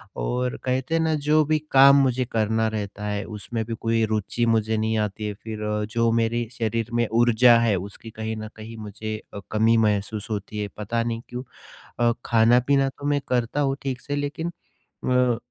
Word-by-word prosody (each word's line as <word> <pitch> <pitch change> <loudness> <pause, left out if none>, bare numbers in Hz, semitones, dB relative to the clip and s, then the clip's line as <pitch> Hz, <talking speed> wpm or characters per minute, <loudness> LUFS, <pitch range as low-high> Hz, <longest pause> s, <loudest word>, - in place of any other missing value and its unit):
और 125 - -2
कहते 130 +4 -1
हैं 165 - +2
ना 160 -1 +1
जो 155 +1 +5
भी 155 +1 +2
काम 135 +1 +8
मुझे 130 -1 +1
करना 110 0 +1
रहता 105 -1 -4
है 105 0 -2
उसमें 110 +2 -4
भी 115 - -4
कोई 115 0 +1
रुचि 110 +2 -1
मुझे 110 -1 +1
नहीं 110 +1 0
आती 105 0 -2
है 105 - -3
फिर 110 +1 -7
अ, 105 0 -1
जो 115 +2 +1
मेरे 115 +1 0
शरीर 115 0 -1
में 120 -1 +2
ऊर्जा 120 +1 +5
है, 115 -3 +2
उसकी 100 +4 -7
कहीं 110 0 -4
न 110 0 -6
कहीं 110 +1 -9
मुझे 110 0 -5 0.2
अ, - - -5
कमी 110 +2 +3
महसूस 105 +1 -2
होती 105 0 -4
है, 105 - -2
पता 115 +3 -1
नहीं 115 -1 -3
क्यों? 125 +1 -5 0.6
अ, 120 0 +3
खाना-पीना 125 +4 +4
तो 140 - -11
मैं 145 0 +1
करता 125 +3 0
हूँ, 135 -1 +1
ठीक 130 -2 -3
से 145 - -3
लेकिन 145 +4 -3 0.6
अ, 125 -2 +3
115 Hz, 195 wpm, -24 LUFS, 110-125 Hz, 0.6 s, काम